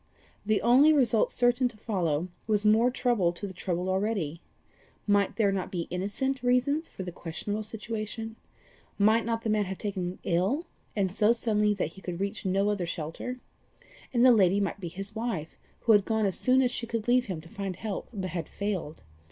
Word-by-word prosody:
The 215 Hz, 0 st, +1 dB
only 260 Hz, +7 st, +6 dB
result 245 Hz, -7 st, +3 dB
certain 245 Hz, +1 st, +3 dB
to 235 Hz, -3 st, -10 dB
follow, 180 Hz, -6 st, -1 dB, 0.2 s
was 210 Hz, -1 st, +1 dB
more 220 Hz, +3 st, +5 dB
trouble 240 Hz, -8 st, +1 dB
to 175 Hz, -, -5 dB
the 190 Hz, -, -6 dB
troubled 180 Hz, 0 st, -2 dB
already. 190 Hz, -5 st, -1 dB, 0.6 s
Might 205 Hz, -2 st, +2 dB
there 205 Hz, -2 st, +3 dB
not 190 Hz, -2 st, -3 dB
be 175 Hz, -, -2 dB
innocent 205 Hz, +9 st, -2 dB
reasons 255 Hz, +6 st, +1 dB
for 190 Hz, -, -7 dB
the 180 Hz, -, -5 dB
questionable 190 Hz, +6 st, -4 dB
situation? 220 Hz, +1 st, -5 dB, 0.6 s
Might 220 Hz, +3 st, +4 dB
not 230 Hz, -1 st, -1 dB
the 225 Hz, -, -1 dB
man 210 Hz, -1 st, +2 dB
have 190 Hz, 0 st, -5 dB
been -, -, -9 dB
taken 185 Hz, -3 st, -3 dB
ill, 190 Hz, -, +1 dB, 0.3 s
and 195 Hz, -3 st, +1 dB
so 210 Hz, +4 st, +4 dB
suddenly 210 Hz, -3 st, +1 dB
that 180 Hz, -6 st, -1 dB
he 195 Hz, +4 st, -14 dB
could 180 Hz, -2 st, -5 dB
reach 200 Hz, 0 st, -3 dB
no 195 Hz, +2 st, +2 dB
other 190 Hz, -4 st, -2 dB
shelter? 170 Hz, +11 st, -5 dB, 0.7 s
And 240 Hz, 0 st, +4 dB
the 255 Hz, -, +9 dB
lady 200 Hz, -3 st, +4 dB
might 200 Hz, 0 st, -2 dB
be 180 Hz, -, -5 dB
his 195 Hz, +4 st, -5 dB
wife, 220 Hz, -9 st, -3 dB, 0.3 s
who 230 Hz, -, +3 dB
had 205 Hz, -2 st, +6 dB
gone 220 Hz, 0 st, 0 dB
as 195 Hz, -, 0 dB
soon 260 Hz, +1 st, +3 dB
as 250 Hz, -, +1 dB
she 240 Hz, -1 st, -3 dB
could 230 Hz, -1 st, -3 dB
leave 250 Hz, +1 st, +4 dB
him 185 Hz, -5 st, -3 dB
to 160 Hz, -, -13 dB
find 195 Hz, +1 st, -5 dB
help, 205 Hz, +1 st, -5 dB
but 190 Hz, -5 st, -4 dB
had 170 Hz, -4 st, -4 dB
failed. 190 Hz, -7 st, -4 dB
205 Hz, 200 wpm, -28 LUFS, 185-230 Hz, 0.7 s, the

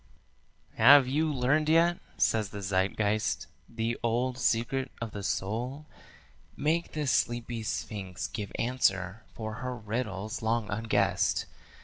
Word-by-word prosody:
"Have 135 Hz, +3 st, +8 dB
you 155 Hz, +4 st, +1 dB
learned 145 Hz, +3 st, +2 dB
yet," 170 Hz, +2 st, +4 dB, 0.2 s
says 110 Hz, -3 st, +2 dB
the 100 Hz, -, -7 dB
Zeitgeist, 100 Hz, +3 st, 0 dB, 0.2 s
"the 115 Hz, 0 st, -2 dB
old 120 Hz, +2 st, 0 dB
secret 130 Hz, +3 st, 0 dB
of 115 Hz, -2 st, -4 dB
the 100 Hz, -, -6 dB
soul? 120 Hz, +10 st, -2 dB, 0.7 s
Make 160 Hz, +4 st, 0 dB
the 150 Hz, -1 st, -2 dB
sleepy 120 Hz, -2 st, 0 dB
sphinx 100 Hz, -4 st, -4 dB
give 105 Hz, -3 st, -5 dB
answer, 100 Hz, -5 st, 0 dB
for 110 Hz, -1 st, -5 dB
her 125 Hz, -1 st, -3 dB
riddle's 105 Hz, -2 st, -4 dB
long 110 Hz, -1 st, 0 dB
unguessed. 110 Hz, +2 st, +1 dB
115 Hz, 120 wpm, -29 LUFS, 105-130 Hz, 0.7 s, Have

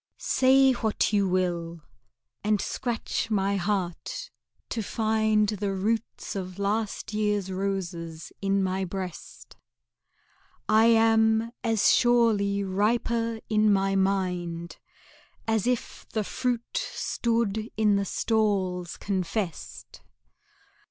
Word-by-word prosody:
VIII -, -, -59 dB
Say 265 Hz, +1 st, +4 dB
what 220 Hz, -2 st, 0 dB
you 200 Hz, -1 st, +3 dB
will, 170 Hz, -3 st, -1 dB, 0.6 s
and 210 Hz, 0 st, +2 dB
scratch 235 Hz, 0 st, -2 dB
my 200 Hz, -2 st, +1 dB
heart 195 Hz, -, -3 dB, 0.4 s
to 225 Hz, -, -2 dB
find 220 Hz, -1 st, +1 dB
The 205 Hz, -2 st, -2 dB
roots 220 Hz, +4 st, -2 dB
of 185 Hz, -1 st, -5 dB
last 210 Hz, +2 st, -2 dB
year's 210 Hz, -2 st, 0 dB
roses 175 Hz, -4 st, -4 dB
in 195 Hz, 0 st, +1 dB
my 190 Hz, 0 st, -1 dB
breast; 185 Hz, -1 st, -7 dB, 1.1 s
I 220 Hz, +1 st, +5 dB
am 225 Hz, 0 st, +4 dB
as 225 Hz, -3 st, +3 dB
surely 220 Hz, -5 st, +3 dB
riper 225 Hz, +3 st, 0 dB
in 215 Hz, -1 st, +3 dB
my 195 Hz, 0 st, +2 dB
mind 180 Hz, -3 st, -1 dB, 0.7 s
As 225 Hz, -1 st, +1 dB
if 250 Hz, -1 st, -2 dB
the 215 Hz, -, -1 dB
fruit 245 Hz, -, -2 dB
stood 230 Hz, -, -1 dB
in 210 Hz, -2 st, +3 dB
the 200 Hz, 0 st, 0 dB
stalls 190 Hz, -5 st, 0 dB
confessed. 185 Hz, -, -4 dB
205 Hz, 105 wpm, -27 LUFS, 190-225 Hz, 1.1 s, I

